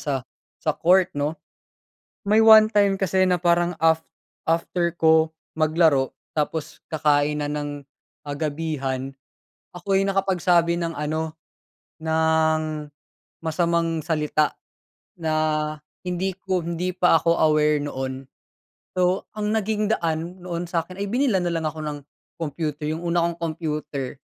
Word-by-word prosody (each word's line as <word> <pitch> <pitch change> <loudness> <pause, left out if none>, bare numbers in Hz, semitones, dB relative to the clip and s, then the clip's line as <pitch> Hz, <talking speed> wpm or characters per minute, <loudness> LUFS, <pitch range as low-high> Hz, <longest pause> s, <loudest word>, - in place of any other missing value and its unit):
sa, 145 - -2 0.4
sa - - -1
court 185 +1 +3
'no? 145 +3 -2 0.9
May 215 +2 +5
one 220 -1 +9
time 200 -3 +2
kasi 190 0 +2
na 180 -1 +2
parang 175 0 +2
af 160 0 +3 0.4
after 170 +1 0
ko 160 0 +4 0.2
maglaro 155 -4 +3 0.2
tapos 155 0 -3
kakain 150 -1 +2
na 145 - -1
ng, 145 -1 -4 0.4
ah, 145 - -3
gabihan, 140 -4 -3 0.6
ako'y 195 +2 +1
nakapagsabi 180 -3 +2
ng 165 -1 -2
ano, 155 +2 -3 0.7
ng 160 -1 +1 0.6
masamang 165 0 0
salita 155 -1 0 0.6
na 160 -2 -1 0.7
hindi 180 +1 -2
ko, 185 -2 -1
hindi 170 +2 -2
pa 180 -2 +4
ako 170 - +2 0.2
aware 150 -1 +3
noon. 135 -2 -5 0.7
So, 180 +1 +2 0.2
ang 210 +1 0
naging 215 0 0
daan 170 +1 -3
noon 175 -1 -4
sakin 175 +2 -3
ay 200 - -2
binilhan 220 -5 +1
nalang 165 -2 -1
ako 155 - -12
ng 145 -1 -4 0.4
computer 150 -1 -3
yung 165 +2 -4
una 170 0 +2
kong 170 0 -1
computer, 150 -5 -4
165 Hz, 125 wpm, -24 LUFS, 150-180 Hz, 0.9 s, one